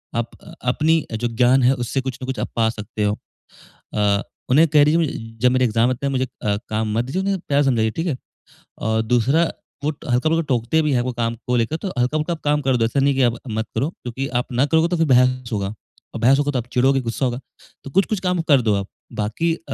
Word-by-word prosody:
आप 115 0 -1 0.3
अपनी 155 +6 +2
जो 115 +2 -1
ज्ञान 125 +3 +3
है 125 +2 +5
उससे 125 +1 -2
कुछ 130 -1 -5
न - - -2
कुछ 130 -1 -3
आप - - -2
पा 115 -1 +2
सकते 110 -1 -5
हो। 105 0 +2 0.8
अ, 105 -1 +2 0.3
उन्हें 150 +6 +6
कह 145 0 +5
दीजिए 155 +3 +3
म 115 -8 -4
जब 125 +1 +4
मेरे 130 0 +3
एग्ज़ाम 115 +1 +2
आते 130 +2 -2
है 140 - +1
मुझे 130 0 +1 0.2
अ, 105 -1 +1
काम 110 0 -1
मत 120 - +1
दीजिए 175 +10 -2
उन्हें 195 0 0
प्यार 145 0 +3
समझाइए, 115 -5 +2
ठीक 165 +10 -3
है? 155 -7 -1 0.6
और 110 +1 0
दूसरा 125 +8 +3 0.4
वो - - +2
हल्का-फुल्का 155 +3 0
टोकते 125 +6 +2
भी 150 - +1
है 125 - +2
वो 130 - -2
काम 115 -1 -1
को 125 - +1
लेकर 115 +7 0
तो 195 - -5
हल्का-फुल्का 155 +7 0
काम 150 0 +2
कर 135 -3 +1
दो, 115 - +2
ऐसा 135 +5 0
नहीं 140 +1 +3
है 135 - -2
की 130 - +4
आप - - -11
मत 110 +1 -1
करो 140 - 0
क्योंकि 130 -4 -5
आप - - -13
ना 125 +3 +3
करोगे 160 +2 +3
तो 175 - 0
फिर 165 - +3
बहस 125 -1 +3
होगा। 100 -2 -1 0.5
और - - -3
बहस 135 +4 +5
होगा 145 0 +1
तो 130 - 0
आप 120 - -6
चिड़ोगे 135 +2 +3
गुस्सा 120 +2 -2
होगा। 125 0 -2 0.4
तो - - -8
कुछ-कुछ 195 +5 +1
काम 180 -2 0
कर 140 -3 +6
दो 110 -3 +2
आप 100 0 -2 0.3
बाकी 110 +11 -1
अ, - - -15
130 Hz, 245 wpm, -21 LUFS, 115-145 Hz, 0.8 s, उन्हें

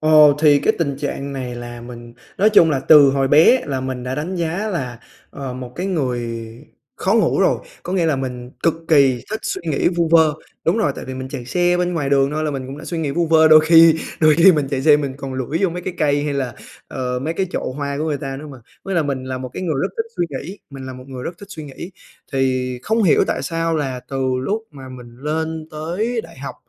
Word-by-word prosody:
Ờ, 155 0 +1 0.3
thì 150 -2 +6
cái - - +2
tình 140 -5 -1
trạng 140 -1 -4
này 125 -2 -5
là 120 0 -8
mình 120 0 -10 0.3
nói 210 +3 +4
chung 170 -7 +6
là 135 - 0
từ 145 -1 +7
hồi 135 -1 +1
bé 165 - +6
là 135 -2 -2
mình 130 -1 -4
đã 125 +1 -3
đánh 165 +6 -4
giá 175 +5 -2
là, 125 - -4 0.3
ờ, 135 -2 -6
một 125 -1 -8
cái 180 - -2
người 120 -9 -2 0.5
khó - - +1
ngủ - - +2
rồi, - - +3 0.2
có 180 - -5
nghĩa 175 -4 +1
là 155 - +1
mình 125 -2 -5
cực 165 - +3
kỳ 135 -6 +4
thích 220 +1 -3
suy - - -3
nghĩ 140 - +2
vu 170 -1 +1
vơ. 160 -2 +5 0.3
Đúng 170 +6 +2
rồi, 220 - +1
tại - - -7
vì 130 - -6
mình 130 0 -6
chạy 125 - -6
xe 175 +7 +1
bên 180 0 -1
ngoài 145 -4 -1
đường 140 0 +3
thôi 155 +1 -2
là 150 - 0
mình 135 -2 -5
cũng 135 +2 -8
đã 160 - -9
suy 165 +1 -4
nghĩ 150 -3 -1
vu 170 +3 0
vơ, 160 0 +5
đôi 155 0 +8
khi 165 0 +7 0.3
đôi 155 -1 +6
khi 175 +4 +7
mình 150 -4 0
chạy 135 -1 -1
xe 150 -1 +6
mình 140 -3 -3
còn 135 -2 -6
lủi 130 +5 -2
vô 195 - +3
mấy 180 +1 -6
cái 185 - -5
cây 145 -1 +2
hay 145 -2 -2
là, 130 -5 -2 0.3
ờ, 125 -1 -3
mấy 160 +4 -2
cái 190 +1 -1
chậu - - -3
hoa 140 +1 -4
của 155 - -1
người 150 -3 -1
ta 135 0 -5
nữa 150 +3 -8
mà. 135 - -11 0.3
Với 195 - -3
lại 165 -4 +2
mình 135 -2 -3
là 130 0 -4
một 130 0 -6
cái - - -6
người 160 -4 -1
rất - - 0
thích 450 0 -2
suy - - +1
nghĩ 150 +8 -7
mình 135 -1 -8
là 130 - -6
một 130 0 -11
người 130 -2 -7
rất 170 - -6
thích 200 - -12
suy 160 -7 -8
nghĩ. 150 +6 -9 0.4
Thì 130 -1 0
không 225 +1 +1
hiểu 180 - +4
tại - - -2
sao 165 -1 -1
là 130 -4 -3
từ 135 -1 -4 0.2
lúc 215 +10 -2
mà 135 -3 -11
mình 120 -2 -12
lên 160 +3 -3
tới 180 +10 -2
đại 135 - -14
học 140 - -6
145 Hz, 260 wpm, -20 LUFS, 130-165 Hz, 0.5 s, đôi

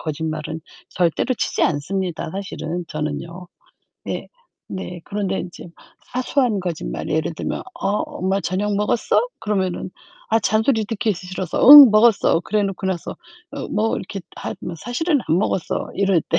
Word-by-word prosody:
거짓말은 155 0 -4 0.3
절대로 175 +8 0
치지 - - -1
않습니다 170 +3 -1
사실은 175 -3 -4
저는요. 155 +4 -5 0.6
네. - - -5 0.4
네. 180 -2 -6
그런데 200 -2 -2
인제 175 - -9 0.5
사소한 250 -4 +1
거짓말 165 - -4
예를 160 +2 0
들면 - - -4 0.2
어 - - 0
"엄마 190 +2 -2
저녁 200 +3 -1
먹었어?" 210 +3 +1 0.2
그러면은 190 -4 -2 0.4
아 225 - +3
잔소리 220 +1 +2
듣기 215 -1 -1
싫어서 185 0 -5
"응, 285 -5 +13
먹었어." 215 -5 +4
그래 210 +4 0
놓고 195 -1 -3
나서 185 -3 -2 0.4
어 - - -5
뭐 220 +1 +1
이렇게 195 +1 -6 0.2
하면 170 - -6
"사실은 275 - 0
안 165 - +2
먹었어." 190 -3 -1
이럴 195 -4 +2
때. 165 - +2
190 Hz, 310 characters per minute, -21 LUFS, 170-215 Hz, 0.6 s, 응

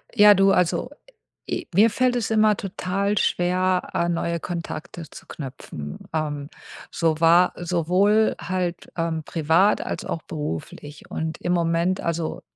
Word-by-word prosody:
Ja, 210 -1 +8
du, 195 0 +4
also 180 +7 +1 0.6
e - - -3
mir 210 +6 +6
fällt 250 +3 +1
es 235 -4 -1
immer 215 -1 +4
total 195 +1 -2
schwer, 180 0 +1
äh, 170 0 0
neue 170 0 -1
Kontakte 170 -1 -6
zu - - -12
knüpfen. 80 - -8
Ähm, 145 -2 -3 0.4
so 160 -2 0
war 170 +2 +5
sowohl 180 +5 +2
halt, 180 -1 -3
ähm, 165 -1 -1
privat 165 +6 +2
als - - -5
auch 165 - -4
beruflich 145 - -7
und 160 0 -4
im 175 - 0
Moment 170 +2 +1
also, 170 -1 -3
175 Hz, 140 wpm, -23 LUFS, 160-195 Hz, 0.6 s, Ja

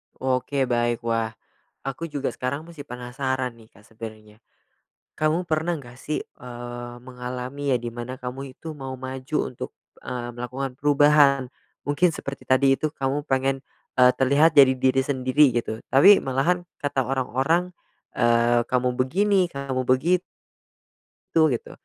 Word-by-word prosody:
Oke 130 +1 0
baik. 120 -2 0
Wah, 115 -1 -1 0.5
aku 155 +5 -4
juga 140 -2 -2
sekarang 140 +5 -3
masih 165 -4 -9
penasaran 130 -1 -3
nih, 115 -1 -19
Kak 100 - -21
sebenernya. 110 -1 -11 0.7
Kamu 155 +3 +1
pernah 160 +2 0
nggak 125 -2 -13
sih, 155 - -2
eee, 120 0 -8
mengalami 125 +2 -4
ya - - +3
di 120 - -6
mana 120 +2 -6
kamu 130 +2 -6
itu 160 - -7
mau 135 -2 -6
maju 130 +3 -4
untuk, 125 - -7 0.3
eee, 125 -1 -4
melakukan 125 +2 -4
perubahan? 145 -2 +5 0.4
Mungkin 145 +5 +3
seperti 140 -3 -7
tadi 135 +1 +4
itu 155 +2 -2
kamu 140 0 -2
pengen, 135 0 0 0.4
eee, 125 0 +8
terlihat 140 +5 +4
jadi 135 -2 +8
diri 130 +1 +2
sendiri 130 0 +3
gitu 110 -2 -2
tapi 190 +10 +8
malahan 140 +7 0 0.2
kata 140 -2 0
orang-orang, 135 +7 0 0.4
eee, 120 0 +3
"Kamu 125 0 +1
begini, 190 +8 +2
kamu 135 -4 -3
begi 155 +8 +3 1.2
"tu" 165 - +6
gitu. 120 - -3
130 Hz, 140 wpm, -24 LUFS, 125-145 Hz, 1.2 s, eee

